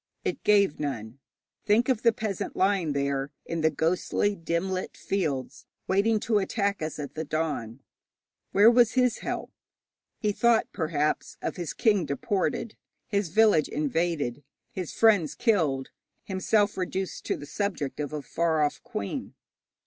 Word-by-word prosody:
It - - -2
gave 200 -6 +4
none. 130 -4 -4 0.5
Think 220 +4 +4
of 255 -4 +1
the 235 - +5
peasant 215 -3 -4
lying 185 -5 +2
there 140 0 -1 0.2
in 165 -1 -3
the 160 - +4
ghostly 175 +6 0
dim 170 +2 -2
lit 185 0 -4
fields 140 -9 -3 0.2
waiting 210 +3 +3
to 220 -3 +2
attack 200 -1 -1
us 155 0 -3
at 145 -2 -6
the 160 - -3
dawn. 145 -6 -3 0.7
Where 210 +4 +7
was 240 -1 +4
his 250 -3 +2
help? - - -4 0.7
He 210 - 0
thought, 230 +2 +3
perhaps, 155 -2 -1
of - - -3
his 175 -4 -4
king 205 - +2
deported, 190 - -1 0.3
his 200 -4 0
village 210 -5 +4
invaded, 150 -3 -1 0.3
his 185 -8 -5
friends 205 -9 +3
killed, 155 - +1 0.3
himself 205 +2 +1
reduced 190 0 -3
to - - -1
the - - -8
subject 155 -4 -3
of 150 -1 -3
a 150 -2 -4
far 160 +2 +1
off 145 - -1
queen. 100 - -5
175 Hz, 150 wpm, -27 LUFS, 150-205 Hz, 0.7 s, Where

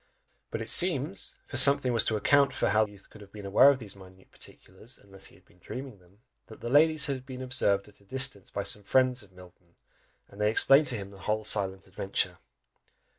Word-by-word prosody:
But - - -5
it - - -7
seems, - - +4
for - - -7
something 140 -3 +5
was 115 - +2
to 110 - -1
account 140 +5 +2
how - - -2 0.2
the - - -13
sleeping - - -16
youth 100 -1 -20
could 110 - -15
have 100 -1 -15
been 105 -1 -11
aware 100 +8 +5
of 140 - +1
these 105 -6 -10
minute 95 -1 -18
particulars, 105 +7 -11
unless 95 -1 -12
he - - -18
had - - -24
been 90 - -27
dreaming 125 +2 -9
them, 90 +4 -26 0.3
that 110 - -14
the 120 - -6
ladies 155 +1 +4
had 135 -2 -4
been 130 -1 -9
observed 100 -6 0
at 105 -1 -20
a - - -24
distance 130 -3 -1
by 100 - -5
some 105 - -5
friends 130 +4 +1
of 100 -3 -16
Milton, 90 -1 -19 0.5
and 100 - -12
they 105 - +2
explained 135 +6 +3
to 125 - -1
him 100 -2 -7
the 100 - -15
whole 110 +3 -3
silent 95 -3 -1
adventure. 95 0 -4
105 Hz, 225 wpm, -27 LUFS, 100-130 Hz, 0.5 s, something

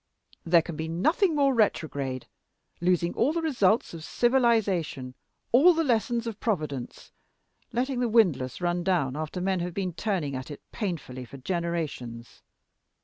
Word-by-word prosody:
There 170 -1 +4
can 170 -2 -6
be 160 +1 -4
nothing 310 - +2
more 280 -2 +3
retrograde 145 - 0 0.5
losing 175 -1 +1
all 275 +7 +2
the 335 - -1
results 230 - +2
of 165 -2 -8
civilization, 210 - +1 0.4
all 320 +9 +7
the 330 - +2
lessons 235 -2 +1
of 225 -2 -5
Providence 155 - -3 0.6
letting 250 +2 -1
the 245 -1 +1
windlass 180 - +2
run 175 0 0
down 165 -8 +1
after 155 +4 -4
men 190 0 0
have 175 0 -4
been 185 -3 -2
turning 175 -8 -2
at 130 +2 -6
it 145 - -7
painfully 165 - -4
for 135 +3 -11
generations. 155 -7 -4
180 Hz, 145 wpm, -27 LUFS, 155-230 Hz, 0.6 s, all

